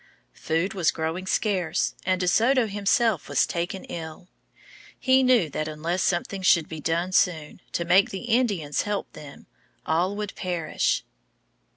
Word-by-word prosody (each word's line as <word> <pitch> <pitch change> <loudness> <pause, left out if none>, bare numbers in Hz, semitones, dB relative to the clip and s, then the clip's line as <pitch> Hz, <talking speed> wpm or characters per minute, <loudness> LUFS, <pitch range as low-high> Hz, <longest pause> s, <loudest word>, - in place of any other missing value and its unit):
Food 165 +5 -1
was 180 -4 +2
growing 165 +3 -3
scarce, 185 -6 0
and 185 -1 +2
De 180 - -1
Soto 240 +6 +3
himself 205 - +1
was - - +3
taken 175 +2 -4
ill. 165 +2 -8 0.7
He 260 0 +4
knew 250 -9 +4
that 155 - -3
unless 165 +4 -2
something 190 +2 -1
should 170 -3 +4
be 160 - -7
done 170 +4 -1
soon 170 -3 0
to 170 - -1
make 185 +3 +4
the 195 - -6
Indians 220 - 0
help 205 -1 -4
them, 145 -2 -12 0.4
all 175 +5 +1
would 210 -1 -4
perish. 175 -3 -1
180 Hz, 150 wpm, -25 LUFS, 165-205 Hz, 0.7 s, He